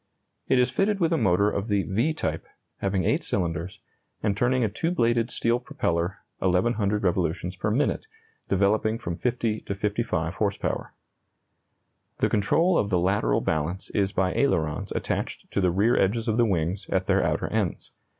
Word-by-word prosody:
It 130 - +3
is 125 0 +3
fitted 200 +1 +1
with 170 -2 +2
a - - +2
motor 100 -2 +3
of 100 +2 -2
the 100 -3 +1
"V" 115 +11 0
type, 80 - -3 0.3
having 95 -1 0
8 - - +1
cylinders, 85 -1 -2 0.4
and 105 -2 +1
turning 125 +3 +2
a - - +3
2 110 +11 -2
bladed 120 -7 +1
steel 120 0 +1
propeller 85 -6 -2 0.2
1,100 100 +2 +1
revolutions 90 0 0
per 95 - -2
minute, 140 - 0 0.4
developing 105 +3 +2
from 85 -6 -4
50 115 0 -1
to 100 - -4
55 100 -5 -1
horse 100 0 -1
power. - - -3 1.2
The - - +1
control 170 - +3
of 100 - 0
the 95 - +2
lateral 90 -9 +1
balance 80 +4 -2
is 100 -1 +1
by 95 -1 0
ailerons 80 - 0
attached - - -3
to - - 0
the 90 - +3
rear 100 +7 +3
edges 110 +4 +1
of 110 0 +1
the 120 -1 +4
wings 90 0 -1
at 95 0 0
their - - +2
outer - - 0
ends. - - -2
100 Hz, 170 wpm, -26 LUFS, 90-115 Hz, 1.2 s, the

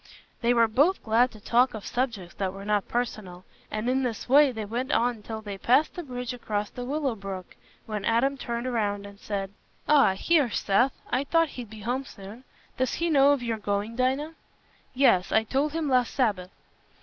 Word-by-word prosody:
They 235 0 +3
were 235 -1 +4
both 290 - +2
glad 235 +3 +3
to 220 - -14
talk 240 +4 +2
of 215 - -8
subjects 230 -8 -3
that 190 -2 -1
were 195 +1 -9
not 210 -1 0
personal, 210 -7 -4 0.2
and 215 +2 -3
in 260 +1 +2
this 240 -4 -3
way 280 +2 +6
they 220 -3 -5
went 240 +5 -3
on 235 -1 +1
till 220 +1 -7
they 200 -2 -6
passed 260 +9 +3
the 355 - -5
bridge 250 -4 -5
across 210 -4 -3
the 245 - -6
Willow 280 -1 -1
Brook, 195 -3 -8 0.3
when 210 -2 -4
Adam 235 +6 +2
turned 235 -2 -4
round 205 -3 -1
and 200 0 -12
said, 195 -3 -4 0.4
"Ah, 275 -10 +5
here's 290 - +2
Seth. 245 +7 +2 0.2
I 255 +3 +1
thought 330 +2 +2
he'd 245 -5 -8
be 220 -1 -11
home 250 +5 -2
soon. 210 +3 -11 0.3
Does 260 0 0
he 340 0 -1
know 280 -1 +6
of 280 -4 0
you're 230 -2 -1
going, 205 +2 -2
Dinah?" 265 +5 0 0.6
"Yes, 240 -9 +3
I 220 - +4
told 275 +6 -1
him 325 -2 -1
last 250 -3 +1
Sabbath." 205 -8 0
235 Hz, 195 wpm, -27 LUFS, 210-265 Hz, 0.6 s, way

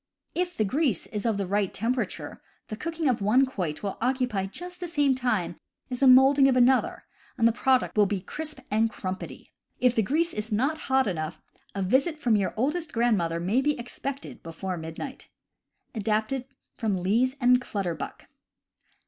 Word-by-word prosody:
If 355 0 -2
the 215 - +2
grease 260 - 0
is 210 +1 -4
of 220 -3 +1
the 200 - -1
right 200 +1 0
tem 230 +5 0
perature, 255 - -4 0.3
the 215 - -4
cooking 325 +5 -3
of 245 -5 +1
one 235 +7 +4
quoit 180 - -4
will 200 - -4
occupy 250 -6 0
just 355 - -9
the 355 - -4
same 290 -5 +2
time 215 -10 -1 0.3
as 250 - -3
the 275 - +5
molding 270 +2 +7
of 265 - +3
another, 255 +1 +3 0.3
and 230 - +5
the - - +4
product 260 +2 +1
will 210 -1 +5
be 200 -1 -1
crisp 305 - -6
and 220 +2 +3
crumpety. 190 -3 -6 0.3
If 250 -1 +4
the 225 - +2
grease 320 - +1
is 210 +2 -4
not 275 +9 +1
hot 265 0 +4
enough, 155 -5 -3 0.4
a 195 - -1
visit 275 - +2
from 245 -7 +2
your 200 -2 0
oldest 305 +7 -1
grandmother 200 -9 +1
may 200 +10 +1
be 295 +1 +1
expected 265 +3 -6
before 180 +3 -5
midnight. 165 +12 -7 0.6
(Adapted 220 +4 -1 0.3
from 215 -5 0
Lees 240 +7 +2
and 250 -1 +5
Clutterhuck.) 190 -8 -4
240 Hz, 175 wpm, -27 LUFS, 200-270 Hz, 0.6 s, molding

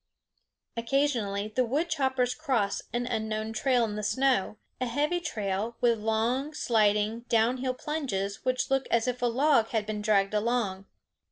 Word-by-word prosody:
Occasionally 230 -5 0
the 255 +4 +1
wood 285 +8 0
choppers 265 -5 0
cross 255 -11 -1
an 240 0 -1
unknown 220 -1 -2
trail 245 +1 +2
in 210 -2 -4
the 210 - -3
snow, 250 -2 +1 0.2
a 255 - -1
heavy 295 +8 0
trail, 215 - -3
with 235 -2 +2
long, 235 +7 0
sliding, 215 -2 +2
down 230 +2 +3
hill 255 0 -2
plunges 230 -10 -3
which 255 +1 0
look 270 0 +1
as 235 +1 +2
if 250 0 -2
a 245 - +3
log 255 -1 +3
had 220 -2 -1
been 210 0 -4
dragged 205 -1 +2
along. 210 -3 -1
235 Hz, 160 wpm, -28 LUFS, 215-260 Hz, 0.2 s, down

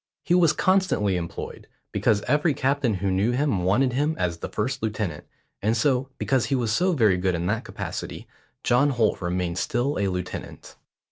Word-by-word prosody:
He 175 - +1
was 175 -3 +5
constantly 185 - +2
employed, 85 -1 -6 0.2
because 105 -2 +1
every 150 0 +2
captain 135 -4 +1
who 95 +1 -1
knew 100 +6 +1
him 135 -6 +1
wanted 120 +8 +2
him 150 +4 +1
as 85 -2 -1
his - - -4
first 130 +5 -2
lieutenant, 105 -7 -3 0.4
and 110 +3 +1
so, 130 +2 +1
because 130 -3 +1
he 140 - +1
was 120 -4 0
so 180 - +2
very 110 - +3
good 90 0 0
in 85 0 -2
that 105 +5 -1
capacity, - - -6 0.4
John 135 +4 +3
Holt 120 -7 +1
remained 90 0 -1
still 125 +7 0
a 100 - +1
lieutenant. 90 -1 -6
115 Hz, 180 wpm, -25 LUFS, 95-135 Hz, 0.4 s, was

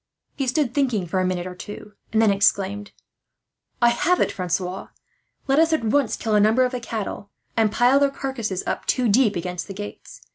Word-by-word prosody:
He 270 -2 -2
stood 255 -1 0
thinking 250 -9 0
for 180 +2 -1
a 185 - +1
minute 180 -1 -2
or 185 - -6
two, 205 +3 -10 0.2
and 220 - +2
then 220 -2 +5
exclaimed: 200 +1 +1 0.9
"I 240 - +7
have 345 +9 +1
it, - - +2
Francois. 180 0 -3 0.6
Let 275 +1 +2
us 325 0 +4
at 315 - +1
once 240 +2 +1
kill 220 -2 -2
a 210 - +5
number 220 +5 +4
of 250 - -2
the 250 - -3
cattle, 220 -3 -5 0.3
and 220 -2 +2
pile 245 +5 +4
their 280 0 +3
carcasses 255 -9 -4
up, - - -3
two 255 -2 +2
deep, 220 0 +3
against 180 +1 -4
the 195 - -8
gates. 195 -10 -9
215 Hz, 205 wpm, -23 LUFS, 195-255 Hz, 0.9 s, I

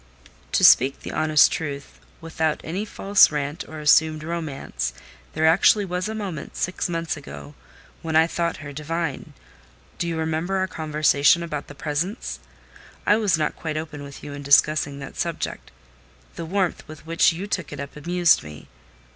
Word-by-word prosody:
"To - - +2
speak 135 +2 +6
the - - -6
honest 155 -1 +4
truth, 140 -3 -5 0.2
without 160 -1 -1
any 185 +6 -3
false 200 -1 +4
rant 145 +1 -3
or 155 0 -8
assumed 155 +1 +3
romance, 140 - -4 0.4
there 155 +1 +1
actually 185 +5 +5
was 180 +2 -3
a 220 - -4
moment, 195 -8 -6
six 180 0 -2
months 165 -1 -2
ago, 145 0 -10 0.5
when 160 -1 -3
I 160 +1 +6
thought 170 0 -2
her 145 - -7
divine. 155 0 -4 0.7
Do 170 - -1
you 165 -1 -2
remember 160 +4 -1
our 190 0 +1
conversation 155 -1 +2
about 150 -4 -5
the 145 - -11
presents? 150 - -3 0.7
I 210 - +5
was 205 -7 +2
not 155 - -1
quite 155 -2 -4
open 155 -2 -6
with 140 -1 -10
you 145 - -7
in 145 - -7
discussing 140 0 +3
that 140 -1 -9
subject: 170 -1 -4 0.7
the 165 - -5
warmth 185 +1 -1
with 155 0 -12
which 165 +1 +3
you 175 +4 -5
took 205 - -3
it 145 - -7
up 140 0 -7
amused 175 +2 +3
me. 75 -1 -12
160 Hz, 170 wpm, -23 LUFS, 145-170 Hz, 0.7 s, speak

